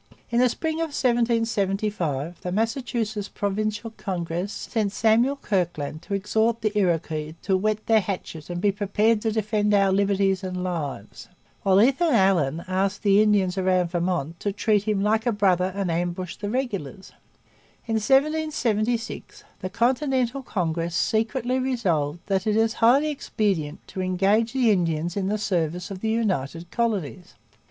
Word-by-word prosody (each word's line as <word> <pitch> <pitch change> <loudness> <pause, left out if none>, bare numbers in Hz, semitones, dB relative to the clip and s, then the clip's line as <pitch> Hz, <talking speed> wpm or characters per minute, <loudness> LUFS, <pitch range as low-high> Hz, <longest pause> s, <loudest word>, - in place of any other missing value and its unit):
In 235 - +2
the 250 0 +5
spring 320 +6 -2
of 325 -3 -3
1775 210 - 0
the 180 - -4
Massachusetts 225 -1 -2
Provincial 210 +2 -2
Congress 180 -2 -4
sent 215 -3 -2
Samuel 230 +6 +3
Kirkland 175 - -2
to 200 - -3
exhort 220 +3 0
the 215 -1 -1
Iroquois 160 -5 0
'to 190 - +2
whet 215 +2 0
their 225 -1 +4
hatchet 180 -5 -6
and 175 0 -3
be 200 +2 +2
prepared 210 +2 +1
to 220 - 0
defend 210 -1 +1
our 195 -1 +4
liberties 195 -1 +1
and 180 -1 -3
lives'; 155 - -5 0.3
while 190 0 +4
Ethan 275 +6 +3
Allen 170 -7 +2
asked 190 +3 -1
the 200 0 +5
Indians 200 -3 +2
round 185 -2 +1
Vermont 170 -3 -2
to 205 - -1
treat 205 0 +1
him 205 -2 +1
'like 220 +2 +1
a - - +4
brother 190 -3 +2
and 195 -3 -1
ambush 175 +1 -2
the 205 - -5
regulars.' 205 - -4 0.7
In 225 -1 0
1776 245 -4 0 0.2
the 185 - -4
Continental 255 +3 0
Congress 170 -7 -2
secretly 230 +5 0
resolved 175 - -1
'that 195 0 -1
it 210 - +2
is 225 0 +2
highly 275 +7 +5
expedient 190 - -2
to 190 - -4
engage 195 +5 +1
the 250 -4 +3
Indians 170 -3 0
in 195 -2 -1
the 210 +2 0
service 180 -3 -2
of 190 - -6
the 220 - -1
United 175 - -1
Colonies.' 195 - -2
200 Hz, 150 wpm, -24 LUFS, 180-225 Hz, 0.7 s, the